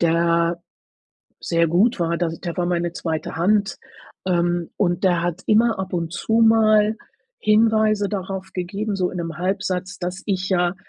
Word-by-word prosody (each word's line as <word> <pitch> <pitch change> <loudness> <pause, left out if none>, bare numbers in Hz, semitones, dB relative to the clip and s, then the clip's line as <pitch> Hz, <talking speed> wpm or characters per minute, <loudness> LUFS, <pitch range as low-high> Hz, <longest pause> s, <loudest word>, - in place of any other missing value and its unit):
der 170 0 +2 0.8
sehr 170 -1 +1
gut 185 +6 +2
war, 170 0 0
da 175 -1 0
der 165 +1 -6
war 175 -1 -1
meine 175 -1 -1
2. 160 -3 -4
Hand, 200 +5 +1 0.5
ähm, 175 -1 0
und 175 -2 0
der 175 -2 +2
hat 175 +1 -2
immer 225 0 +3
ab 190 -1 -5
und 165 -1 -2
zu 220 - -3
mal 220 -1 +4 0.4
Hinweise 215 -1 +3
darauf 190 -1 -5
gegeben, 200 +4 -3
so 185 -2 0
in - - -7
'nem 165 -2 -5
Halbsatz, 185 -1 -2
dass 180 +1 -5
ich 190 -1 -1
ja 175 -1 +1
180 Hz, 160 wpm, -22 LUFS, 170-205 Hz, 0.8 s, mal